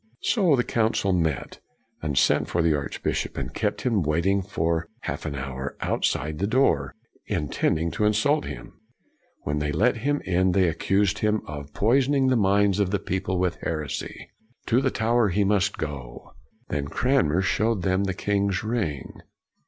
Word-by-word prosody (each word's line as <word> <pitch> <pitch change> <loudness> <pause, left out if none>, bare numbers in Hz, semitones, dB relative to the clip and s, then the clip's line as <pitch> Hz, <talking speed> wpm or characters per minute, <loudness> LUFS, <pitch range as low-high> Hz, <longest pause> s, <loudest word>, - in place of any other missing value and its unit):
So 185 - +3
the 120 - +1
Council 110 -5 +1
met, 80 -4 -1 0.4
and 75 -3 -2
sent - - +3
for 85 - 0
the 80 -1 +3
archbishop, 70 -2 -3
and - - -4
kept - - -1
him 115 -6 +1
waiting 85 +6 +1
for 85 -4 -1
half - - -4
an 70 - -4
hour 65 0 -5
outside 75 +3 -1
the 100 - 0
door, 105 - +2 0.3
intending 80 +3 0
to 105 - 0
insult 110 +9 +2
him. 65 -4 -9 0.6
When 75 +1 -1
they 75 0 -1
let 115 - +2
him 145 +5 0
in 90 0 +2
they 95 -1 +3
accused 95 +5 +1
him 105 0 +1
of 75 -1 -8
poisoning 135 +4 +3
the 130 - +3
minds 100 -2 +3
of 100 - +3
CRANMER 100 0 -2
87 - - -27
the - - -11
people 95 -1 -2
with 90 -1 0
heresy. 75 -4 -5 0.3
To 120 +3 +2
the 135 - +2
Tower 115 -2 +2
he 100 +3 +1
must 100 0 +1
go. 70 -6 -7 0.4
Then 70 -1 -2
Cranmer 95 - +1
showed 105 +1 +1
them 95 +1 +1
the 95 -2 -2
king's 100 0 0
ring. 110 - -3
95 Hz, 170 wpm, -25 LUFS, 75-110 Hz, 0.6 s, So